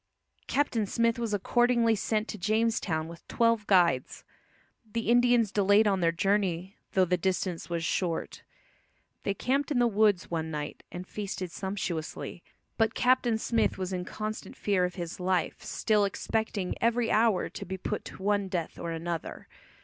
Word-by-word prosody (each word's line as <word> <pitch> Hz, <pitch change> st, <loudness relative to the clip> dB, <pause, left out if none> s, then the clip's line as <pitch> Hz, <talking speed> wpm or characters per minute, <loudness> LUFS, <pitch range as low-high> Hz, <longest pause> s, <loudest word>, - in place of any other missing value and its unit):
Captain 240 Hz, -7 st, +1 dB
Smith 230 Hz, +2 st, +1 dB
was 230 Hz, -2 st, -2 dB
accordingly 235 Hz, +3 st, +3 dB
sent 215 Hz, +1 st, -1 dB
to -, -, -5 dB
Jamestown 210 Hz, -5 st, 0 dB
with 170 Hz, 0 st, -12 dB
twelve 230 Hz, -2 st, +2 dB
guides. 170 Hz, -10 st, +3 dB, 0.7 s
The 230 Hz, 0 st, 0 dB
Indians 240 Hz, -3 st, +4 dB
delayed 205 Hz, +1 st, +4 dB
on 195 Hz, -2 st, +2 dB
their 165 Hz, -2 st, +3 dB
journey, 190 Hz, 0 st, 0 dB, 0.2 s
though 190 Hz, -1 st, +4 dB
the 180 Hz, +1 st, +1 dB
distance 180 Hz, -1 st, -2 dB
was 170 Hz, -1 st, -2 dB
short. 170 Hz, 0 st, -2 dB, 0.8 s
They 200 Hz, -, -1 dB
camped 270 Hz, +7 st, 0 dB
in 290 Hz, -, 0 dB
the 245 Hz, -, +4 dB
woods 210 Hz, -5 st, +2 dB
one 160 Hz, -1 st, -2 dB
night, 150 Hz, -1 st, -5 dB
and 180 Hz, +1 st, -6 dB
feasted 190 Hz, -3 st, -5 dB
sumptuously; 175 Hz, -3 st, -4 dB, 0.4 s
but 225 Hz, 0 st, +2 dB
Captain 250 Hz, -2 st, +3 dB
Smith 225 Hz, 0 st, +1 dB
was 190 Hz, 0 st, -3 dB
in 180 Hz, -1 st, -2 dB
constant 215 Hz, +3 st, -5 dB
fear 195 Hz, -3 st, +1 dB
of 180 Hz, -, -4 dB
his 175 Hz, -1 st, -5 dB
life 180 Hz, -2 st, 0 dB
still, 210 Hz, -2 st, +1 dB
"expecting 200 Hz, -1 st, -1 dB
every 230 Hz, 0 st, +2 dB
hour 220 Hz, -3 st, +3 dB
to -, -, -7 dB
be 190 Hz, +1 st, -5 dB
put -, -, -3 dB
to 190 Hz, -, -9 dB
one 200 Hz, -1 st, +1 dB
death 175 Hz, -3 st, -3 dB
or 170 Hz, -, -4 dB
another." 165 Hz, 0 st, -4 dB
200 Hz, 160 wpm, -29 LUFS, 180-225 Hz, 0.8 s, Indians